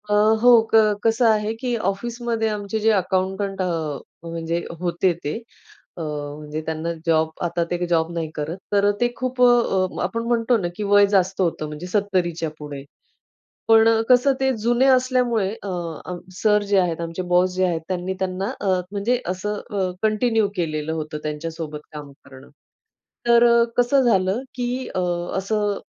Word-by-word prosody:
अ, - - +1 0.3
हो, 245 +1 +7 0.2
क - - +8 0.3
कसं 225 +2 +2
आहे, 215 0 +1
की 245 +2 -3
ऑफिसमध्ये 230 +2 -2
आमचे 210 +1 -3
जे 220 +1 +2
अकाऊंटंट 190 0 -1
अ, 160 -5 -2 0.3
म्हणजे 165 +1 -3 0.2
होते 175 +1 +1
ते. 145 - -2 0.6
अ, - - -5
म्हणजे 150 0 -5
त्यांना 160 +1 -3
जॉब, 160 -1 +2 0.2
आता 170 0 0
ते 175 0 -1
जॉब 165 -1 +1
नाही 165 -2 -3
करत. 155 +3 -4
तर 205 0 +3
ते 240 0 +2
खूप 255 0 -3
अ, 235 -7 +3
आपण 230 +6 -2
म्हणतो 235 0 +2
ना, 185 -5 -2
की 210 - -4
वय 205 0 +5
जास्त 195 -1 +1
होतं, 165 -3 -1
म्हणजे 150 +4 -7
सत्तरीच्या 180 -5 0
पुढे. 145 -2 -7 0.8
पण 225 0 +6 0.2
कसं, 255 +2 +5
ते 265 0 +2
जुने 240 +2 +3
असल्यामुळे 250 -5 +1
अ, 200 - -4 0.7
सर 210 -1 +3
जे 200 - +5
आहेत 170 -2 0
आमचे, 165 +2 -4
बॉस 180 +1 +3
जे 185 0 +2
आहेत, 170 -3 -1
त्यांनी 185 0 -2
त्यांना 190 +1 -2
अ, 205 - -2 0.2
म्हणजे 225 +5 0
असं 200 +3 -3
अ, 195 -4 -1
कंटिन्यू 220 0 +2
केलेलं 155 -3 -2
होतं 155 -1 -4
त्यांच्यासोबत 155 0 -5
काम 145 -2 -8
करणं. 130 +1 -14 0.8
तर 235 0 +6
अ, 235 0 +5
कसं 245 +3 +4
झालं, 195 -1 +2
की 250 +1 -3
अ, - - +1 0.4
असं 205 +1 -1
190 Hz, 160 wpm, -22 LUFS, 165-225 Hz, 0.8 s, क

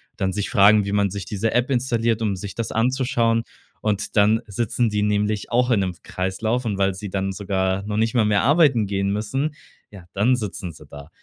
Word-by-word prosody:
dann 95 0 -1
sich 105 -1 -2
fragen, 100 +1 +5
wie 100 - -3
man 100 -1 +2
sich 100 -1 -5
diese 110 +1 -2
App 125 +2 +1
installiert, 120 -3 0
um 100 -3 0
sich 100 +1 -7
das 115 - -3
anzuschauen. 115 -1 +1 0.4
Und 105 +1 -2
dann 105 +2 +4
sitzen 115 +3 0
die 105 -1 0
nämlich 105 0 -1
auch 125 +1 +2
in 115 -5 +3
'nem 95 -1 -2
Kreislauf 110 +7 -2
und 100 -3 -2
weil 95 -1 +1
sie 100 0 -7
dann 95 0 -1
sogar 95 -1 -1
noch 105 0 -3
nicht 115 +3 0
mal 115 -3 +4
mehr 105 -1 +2
arbeiten 140 - +3
gehen 100 0 -1
müssen, 135 +9 -2 0.4
ja, 95 -4 -12
dann 115 +6 +3
sitzen 95 -6 -5
sie 75 -1 -15
da. 70 +2 -11
105 Hz, 210 wpm, -22 LUFS, 100-115 Hz, 0.4 s, fragen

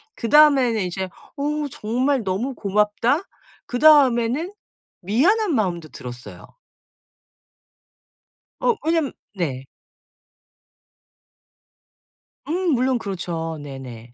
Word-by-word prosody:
그 230 - -4
다음에는 270 -6 +5
이제 185 +1 -4 0.3
'어우 295 +1 -2
정말 250 +4 0
너무 200 +8 -2
고맙다.' 210 - +1 0.4
그 245 - -4
다음에는 285 - +4 0.5
미안한 325 - +2
마음도 175 -8 -1
들었어요. 125 -1 -10 2.1
어 480 - +2
왜냐하면 325 -4 +1 0.2
네. 135 -8 -3 2.8
음 355 +2 0
물론 255 0 +1
그렇죠 170 -5 -4
네네. 125 -4 -10
235 Hz, 190 characters per minute, -22 LUFS, 180-290 Hz, 2.8 s, 다음에는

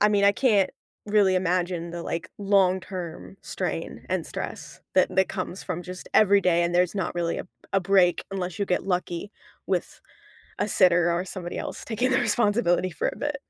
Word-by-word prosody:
I 210 - +5
mean, 205 -1 +3
I 200 - +6
can't 205 -6 +3 0.4
really 205 -2 +4
imagine 180 -1 0
the, 170 0 -5
like, 170 +2 -4
long-term 185 - 0
strain - - -4
and - - -1
stress - - -7
that - - +3
that 190 0 +3
comes 185 0 -4
from 180 -2 -4
just 180 +1 -9
every 200 -2 +6
day 175 -2 +3
and 170 0 -1
there's 180 +1 +2
not 190 -4 -2
really 170 -1 -1
a - - -5
b - - -27 0.2
a 195 - +4
break 185 -1 +3
unless 185 -1 -4
you 200 - +1
get 180 - 0
lucky 180 0 -2 0.4
with - - -2 0.6
a - - +1
sitter 175 -3 +4
or 175 +2 -1
somebody 180 -2 -6
else - - -5
taking 240 +3 0
the 260 - +3
responsibility 205 -5 +2
for 160 - -1
a - - -5
bit. 290 0 -2
185 Hz, 190 wpm, -25 LUFS, 175-200 Hz, 0.6 s, I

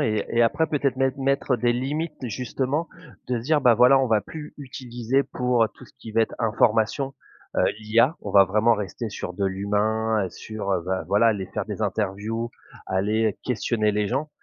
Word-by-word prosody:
et 110 -2 0
et 120 - +3
après 150 +7 +2
peut-être 140 -4 0
mettre 135 0 +1
mettre 135 -1 +1
des 120 +1 +2
limites 150 +6 -2
justement 130 +7 -2 0.4
de 125 -1 0
se - - -6
dire, 150 0 +3
bah, 125 -3 +5
voilà, 125 +4 +6
on 130 - +1
va 110 -2 +3
plus 150 +4 -9
utiliser 125 -1 -2
pour 125 -3 +1
tout - - -14
ce - - -21
qui 110 - -9
va 115 +1 +3
être - - -3
information, 115 +4 +1 0.4
heu, - - +3 0.2
l'IA. 115 +8 +2
On - - -6
va 100 -1 +8
vraiment 110 +5 +3
rester 105 +3 -4
sur 90 - -6
de 100 +2 -2
l'humain, 105 +2 0
heu, - - -9
sur, 105 -1 -5
heu, 85 - 0
bah, 95 -2 -2
voilà 100 +4 +3
aller 100 -4 -1
faire 100 0 -4
des 105 +1 -4
interviews, 105 +3 -2 0.4
aller 105 +3 0
questionner 110 -3 0
les 105 -1 0
gens 135 +5 -1
115 Hz, 195 wpm, -24 LUFS, 105-130 Hz, 0.4 s, va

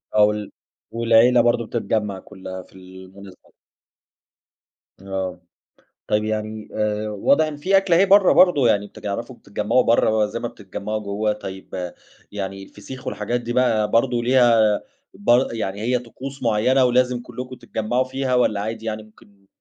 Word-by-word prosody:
آه 105 - +6
وال 105 0 0 0.4
والعيلة 115 +1 +4
برضو 120 -1 +1
بتتجمَّع 105 -4 -2
كلها 95 -1 -9
في - - -24
المناسبة. 95 +1 -14 1.5
آه، 95 -2 -4 0.7
طيب 105 0 +1
يعني 110 0 -4
آآ، 105 0 -1
واضح 125 +9 +2
إن 155 -1 -5
فيه 185 +7 +2
أكلة 195 -3 +3
أهي 190 +3 +5
برّا 200 -1 +6
برضو، 165 -8 +5
يعني 105 -2 +2
بتعرفوا 115 +5 -6
بتتجمعوا 105 +5 0
برّا 110 -2 +3
زي - - -5
ما - - -3
بتتجمعوا 105 +1 -6
جوه 105 +1 -1
طيب، 95 -3 -7 0.4
يعني 95 -1 -5
الفسيخ 115 +6 -11
والحاجات 120 +4 -2
دي 120 0 -4
بقى 110 -4 +2
برضو 120 +1 +2
ليها 120 -4 +4 0.3
ب 130 -11 +3
يعني 100 -3 -4
هي 125 +3 +1
طقوس 130 +3 -9
معيّنة، 120 +3 +3
ولازم 125 0 +2
كلّكم 125 +1 -8
تتجمعوا 120 +3 -2
فيها 130 0 -2
والّا 115 -5 +2
عادي 110 +2 -5
يعني 110 -1 -3
ممكن 100 -2 -22
110 Hz, 145 wpm, -22 LUFS, 105-125 Hz, 1.5 s, آه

